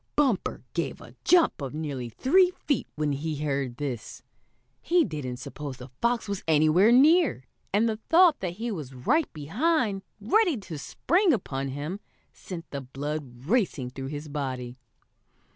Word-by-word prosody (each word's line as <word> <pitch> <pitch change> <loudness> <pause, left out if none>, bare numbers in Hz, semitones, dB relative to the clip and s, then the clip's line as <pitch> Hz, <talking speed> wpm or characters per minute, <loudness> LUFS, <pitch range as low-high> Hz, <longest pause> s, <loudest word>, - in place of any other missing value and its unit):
Bumper 265 -9 +1
gave - - -2
a - - -13
jump 345 - +4
of 135 +1 -5
nearly 140 -6 -4
three 355 - +4 0.2
feet 285 -6 0
when 150 -1 0
he 150 +3 -2
heard 135 -4 -2
this. 130 -6 -5 0.6
He 345 -1 +3
didn't 130 -5 -5
suppose 140 0 -7
the 125 0 -10
fox 235 -1 +1
was 200 -1 -3
anywhere 160 +7 +5
near, 290 - +5 0.3
and 210 +4 +3
the 220 -1 -1
thought 335 -2 +6
that 180 -3 -3
he 225 +5 -4
was 145 -9 -6
right 290 - +1
behind, 205 - 0 0.2
ready 350 - +3
to 180 -7 -7
spring 360 - +2
upon 140 - -2
him, 145 +8 -4 0.3
sent 170 -3 -8
the 140 - -4
blood 135 -1 -6
racing 170 - 0
through 135 +1 -6
his 145 +2 -6
body. 130 -4 -4
160 Hz, 155 wpm, -27 LUFS, -, 0.6 s, thought